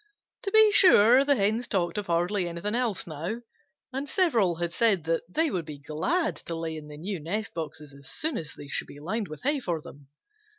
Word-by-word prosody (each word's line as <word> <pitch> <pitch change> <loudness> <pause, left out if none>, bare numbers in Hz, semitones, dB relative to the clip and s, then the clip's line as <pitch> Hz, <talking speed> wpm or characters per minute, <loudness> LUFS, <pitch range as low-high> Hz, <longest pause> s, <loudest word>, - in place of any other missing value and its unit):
To 395 - -3
be 435 0 +7
sure 265 - +7
the 285 0 +4
Hens 220 +2 +1
talked 175 -5 -1
of 205 - -6
hardly 175 +2 +1
anything 170 +5 -3
else 235 -5 -1
now, 170 +9 -5 0.5
and 275 +2 -3
several 235 - +2
had 170 +1 -3
said 205 -7 +2
that 165 +1 0
they 315 - +1
would 175 -4 -2
be 150 -2 -8
glad 200 - -1
to 165 - -6
lay 165 -1 -4
in 155 -1 -8
the 150 0 -10
new 185 +3 -4
nest 200 +7 -3
boxes 150 -3 -6
as 140 -1 -14
soon 315 +2 -2
as 155 - -5
they 145 - -10
should - - -2
be 145 - -12
lined 195 +7 -3
with 155 - -10
hay 285 +2 +1
for 175 -10 -2
them. 145 -2 -13
185 Hz, 215 wpm, -27 LUFS, 160-240 Hz, 0.5 s, be